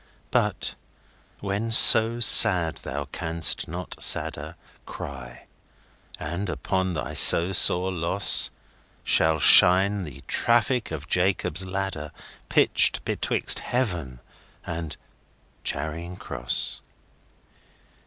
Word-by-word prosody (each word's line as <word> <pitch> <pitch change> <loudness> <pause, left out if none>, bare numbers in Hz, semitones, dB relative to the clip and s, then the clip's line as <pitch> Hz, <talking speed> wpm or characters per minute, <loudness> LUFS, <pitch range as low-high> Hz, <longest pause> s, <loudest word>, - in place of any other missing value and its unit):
But - - -2 0.7
(when 100 +3 -5
so 115 0 +7
sad 90 - +5
thou 70 +1 -7
canst 80 0 -1
not 90 +2 -9
sadder)Cry;—and 70 +7 -5
upon 95 0 -4
thy 65 -5 -6
so 85 +3 +5
sore 95 0 +2
lossShall 80 -2 -1
shine 95 +5 +4
the 70 -4 -12
traffic 120 +1 -1
of 80 -1 -9
Jacob's 90 -2 -1
ladderPitched 95 -5 -3
betwixt - - 0
Heaven 85 - -5 0.4
and 85 -2 -7 0.7
Charing 80 +5 -6
Cross. - - -5
90 Hz, 80 wpm, -23 LUFS, 75-95 Hz, 0.7 s, so